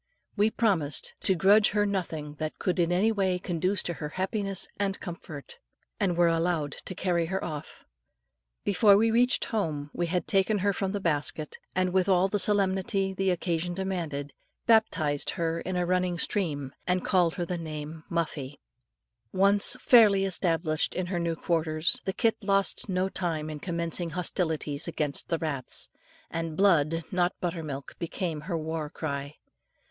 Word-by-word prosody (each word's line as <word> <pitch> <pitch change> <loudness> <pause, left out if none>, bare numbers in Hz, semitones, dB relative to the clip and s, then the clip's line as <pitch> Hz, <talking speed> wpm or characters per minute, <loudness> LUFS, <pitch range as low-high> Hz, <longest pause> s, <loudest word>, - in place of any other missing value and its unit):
We 210 +1 +3
promised 185 -11 0
to 190 - +2
grudge 200 +4 +5
her 205 - +3
nothing 165 -7 -3
that 155 -1 -4
could 185 -1 -1
in 170 0 +2
any 195 +6 +3
way 190 -4 +1
conduce 180 +1 -1
to 175 - -2
her 150 -2 -6
happiness 195 +2 -1
and 200 -1 -1
comfort, 160 -5 -9 0.4
and 175 -2 0
were 175 - +5
allowed 165 -3 0
to 185 - -5
carry 175 -2 0
her 190 +3 -2
off. 155 -2 -7 0.8
Before 200 0 +5
we 225 +2 +3
reached 245 +3 +3
home, 155 -9 -2
we 175 - -1
had 180 +1 -1
taken 195 +1 +2
her 200 - +3
from 190 0 -2
the 205 - -2
basket, 155 -3 -2 0.2
and 185 -1 +1
with 190 0 +2
all 185 0 +4
the 205 +1 -1
solemnity 195 -1 +1
the 190 0 0
occasion 175 -1 -1
demanded, 170 -7 -3 0.3
baptized 160 -11 +2
her 165 0 -1
in 185 - -4
a 180 0 +1
running 180 0 0
stream, 150 -8 -1
and 180 0 0
called 175 -4 +2
her 175 - -2
name 155 -1 -6
Muffie. 150 -5 -3 0.7
Once 200 +2 +5
fairly 210 -6 +6
established 165 -4 0
in 185 - -1
her 175 - 0
new 170 -1 -1
quarters, 165 +7 +1
the 190 - -1
kit 225 +1 +2
lost 195 0 +1
no 185 0 +1
time 160 -5 -3
in 150 - -6
commencing 170 0 -2
hostilities 160 -3 -1
against 150 -4 0
the 165 - +1
rats, 145 -6 +1 0.4
and 165 -1 -4
blood, 165 -4 +3
not 180 -1 0
butter 175 -1 -3
milk, 140 -3 -6
became 170 -2 -3
her 170 +2 -3
war 160 -1 -4
cry. 145 -2 -5
175 Hz, 165 wpm, -28 LUFS, 160-195 Hz, 0.8 s, fairly